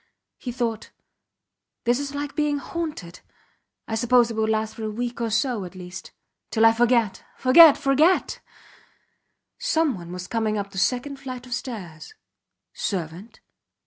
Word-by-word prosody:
He 245 - -5
thought: 235 -3 -3 0.9
This 240 +2 +2
is 285 0 -5
like 285 0 -4
being 295 -1 +1
haunted 285 - -5 0.7
I - - -5
suppose 240 +1 +3
it - - -4
will 220 0 0
last 220 0 0
for 225 - -8
a 215 - -2
week 235 +2 -4
or 230 - 0
so, 220 0 0
at 180 +1 -9
least. 180 0 -9 0.4
Till 225 -1 +3
I 225 - +8
forget. 235 -3 +2
Forget! 290 +4 +8
Forget! 300 +7 +2 1.2
Someone 310 - 0
was 180 0 -6
coming 220 0 -1
up 200 -1 -4
the 190 - -4
second 255 +6 0
flight 255 -2 -7
of 250 - -6
stairs. 205 - -7 0.6
Servant? 185 +4 -5
235 Hz, 145 wpm, -24 LUFS, 210-275 Hz, 1.2 s, I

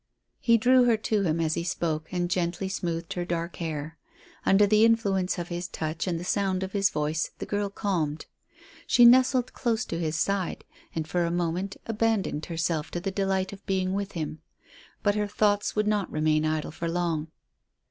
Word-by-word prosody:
He 230 -1 +4
drew 250 +2 +5
her 235 -2 +4
to 215 -1 0
him 165 -3 0
as 160 -1 +1
he 170 - -2
spoke, 160 -3 -2
and 175 -1 0
gently 175 +1 -1
smoothed 170 -3 -3
her 175 - -2
dark 170 -1 -3
hair. 155 -1 -5 0.5
Under 200 +2 +6
the 215 +2 +4
influence 200 -5 +2
of 175 -1 -4
his 175 0 -3
touch 155 +1 -4
and 170 -2 -1
the - - -6
sound 190 0 0
of 190 - -4
his 195 -1 +2
voice, 155 0 -1
the - - -5
girl 205 -1 -1
calmed. 170 -7 -2 0.6
She 240 - +6
nestled 255 +1 +5
close 230 -3 0
to 165 - -4
his 160 -2 -1
side, 195 +2 -1 0.3
and 160 -1 -2
for 175 +2 0
a 170 - 0
moment 175 +3 -2
abandoned 220 -8 0
herself 165 -2 -1
to 175 - -3
the 195 +2 -3
delight 190 -1 -1
of 200 0 -11
being 190 -1 0
with 200 0 -3
him. 160 -2 -4 0.6
But 205 - +3
her 210 0 0
thoughts 205 0 +1
would 210 0 +2
not 210 -3 0
remain 155 0 +2
idle 155 -1 -1
for 170 +2 -4
long. 165 -2 -1
180 Hz, 190 wpm, -27 LUFS, 165-205 Hz, 0.6 s, Under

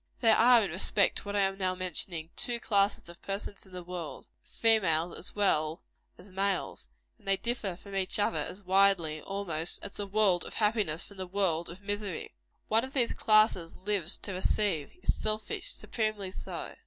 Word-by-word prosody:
There 225 -2 +5
are, 240 -1 +6
in 195 - -2
respect 195 +2 +2
to - - -10
what 205 0 -4
I 200 - +3
am 195 0 0
now 185 -1 0
mentioning, 175 -2 -2
two 240 -1 -1
classes 200 -5 +2
of 170 0 -12
persons 200 0 -5
in - - -18
the 180 -1 -7
world 175 -2 -6 0.2
of - - -26
females 180 -7 +2
as 185 - -5
well 160 -6 +1 0.3
as 185 +2 -13
males; 195 - -1 0.3
and - - -21
they 195 0 +3
differ 225 -6 -2
from 195 +2 -10
each 190 -1 0
other 205 -6 +1
as 185 +7 -4
widely, 185 -5 +3
almost, 175 -4 -2
as 200 - -6
the 205 - -5
world 195 -3 +3
of - - -6
happiness 210 -7 +2
from 200 - -12
the 185 -1 -4
world 180 -3 0
of 175 +3 -9
misery. 205 -3 -3 0.3
One 225 +2 +3
of 265 +1 -6
these 245 -4 +2
classes 215 -6 +3
lives 190 -3 -1
to 200 - -4
receive; 185 -4 0
is - - +2
selfish 215 - -3
supremely 215 - -2
so. - - -6
195 Hz, 190 wpm, -30 LUFS, 175-210 Hz, 0.3 s, are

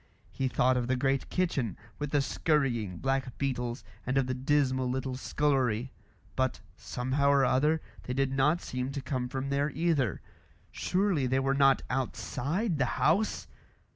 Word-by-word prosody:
He 135 - -1
thought 125 0 +2
of 120 -1 -1
the 130 - +2
great 135 +1 0
kitchen, 140 - -1 0.2
with 145 -1 -2
the 145 -1 +2
scurrying 125 - 0
black 135 +3 -1
beetles, 125 -3 -2 0.2
and 130 +2 -1
of 135 - +3
the 130 - -2
dismal 130 -1 +1
little 130 0 -2
scullery; 130 -3 0 0.4
but, 130 -1 0 0.2
somehow 130 +3 0
or 140 -1 +5
other, 150 +5 +2 0.2
they 125 - -3
did 135 0 +1
not 150 +6 +2
seem 125 +1 -3
to 140 - -3
come 130 -3 -2
from 135 +2 -3
there 140 +1 +1
either. 150 - 0 0.5
Surely 180 -8 +1
they 130 +1 +1
were 135 0 +1
not 135 -1 +4
outside 145 - -2
the 130 - +3
house! 195 +8 +2
135 Hz, 160 wpm, -30 LUFS, 125-145 Hz, 0.5 s, or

